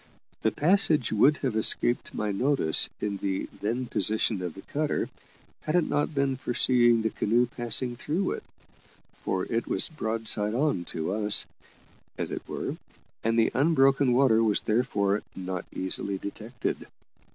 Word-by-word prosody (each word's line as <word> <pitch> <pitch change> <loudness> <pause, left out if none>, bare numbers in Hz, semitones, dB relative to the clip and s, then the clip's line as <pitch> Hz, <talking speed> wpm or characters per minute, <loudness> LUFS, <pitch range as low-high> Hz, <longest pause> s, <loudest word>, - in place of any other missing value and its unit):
The - - +3
passage 160 - +2
would 140 +8 +4
have 125 -4 -1
escaped 120 +2 +2
my 105 -1 -1
notice 125 - +2
in 100 -1 -2
the 95 -1 -2
then 120 +5 -2
position 110 -2 +1
of 90 -3 -5
the 95 - -11
cutter, 150 +1 -2 0.5
had 155 - -2
it 175 -3 +3
not 145 +1 -1
been 135 -1 0
for 125 -2 -4
seeing 120 -3 +4
the 110 - 0
canoe 120 +3 +2
passing 120 +1 0
through 160 +9 -2
it, - - -5 0.7
for 95 -1 -3
it 115 0 -2
was - - -1
broadside 110 -6 -1
on 135 - 0
to 80 +3 -3
us, 105 -1 +3 0.7
as - - -3
it - - -4
were, - - -4 0.5
and 115 +1 +1
the 115 - +3
unbroken 135 -2 +3
water 120 -3 +4
was 105 -2 +2
therefore 105 -3 +1
not 95 -1 -5
easily 95 +1 -2
detected. 110 +5 -5
115 Hz, 150 wpm, -27 LUFS, 105-135 Hz, 0.7 s, would